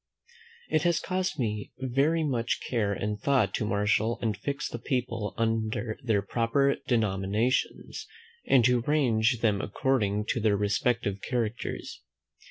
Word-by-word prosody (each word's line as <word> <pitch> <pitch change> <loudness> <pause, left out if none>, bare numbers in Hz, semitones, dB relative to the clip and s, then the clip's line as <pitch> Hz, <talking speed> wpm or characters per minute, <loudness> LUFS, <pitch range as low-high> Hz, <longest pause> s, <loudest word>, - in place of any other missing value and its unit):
It 155 - +2
has 170 -1 +2
cost 185 -3 -2
me 105 -5 -3
very 135 +6 +1
much 120 -5 0
care 110 -5 -1
and 105 +1 -2
thought 130 -8 +2
to - - -1
marshal 105 +3 +1
and 110 -3 -1
fix 140 +8 -3
the 120 - -6
people 120 -5 -2
under 110 0 -1
their 110 -6 +1
proper 120 +6 +1
denominations, 110 +1 0 0.4
and 125 -4 +5
to 125 0 +4
range 120 -4 +2
them 105 -3 +2
according 105 -6 0
to - - +1
their 105 -2 +2
respective 100 0 0
characters. 120 -3 -3
115 Hz, 135 wpm, -28 LUFS, 105-130 Hz, 0.4 s, and